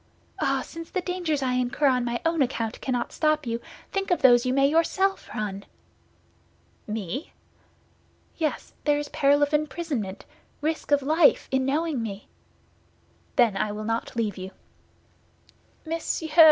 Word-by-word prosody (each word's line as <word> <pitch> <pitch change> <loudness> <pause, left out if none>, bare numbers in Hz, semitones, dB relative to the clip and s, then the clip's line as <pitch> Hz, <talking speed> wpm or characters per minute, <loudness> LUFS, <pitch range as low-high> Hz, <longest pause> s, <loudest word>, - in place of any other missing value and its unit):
Ah, 270 -1 +1
since 330 0 -9
the 375 - -1
dangers 350 -6 -1
I 255 -1 +1
incur 250 +3 0
on 255 -3 +4
my 240 0 -1
own 330 -2 +2
account 230 -4 -1
cannot 245 -2 -1
stop 305 -1 +1
you, 230 0 -2 0.3
think 390 -1 -1
of 355 - +1
those 245 -1 +6
you - - +2
may 275 +1 +4
yourself 355 +5 +1
run!" 200 -2 -3 1.2
"Me?" 215 - -4 1.0
"Yes; 315 -3 -2
there 295 -1 +3
is 295 0 -4
peril 285 +1 +3
of 290 +1 0
imprisonment, 295 - -2 0.3
risk 315 +2 -2
of 285 -1 +4
life 315 +3 +4
in 265 -1 +2
knowing 300 -1 0
me." 205 -2 -6 1.1
"Then 235 -6 +4
I 205 +2 0
will 210 +1 -5
not 225 +2 -2
leave 215 -4 -1
you." 185 +1 -6 1.4
"Monsieur!" 325 0 -2
275 Hz, 145 wpm, -26 LUFS, 235-315 Hz, 1.4 s, those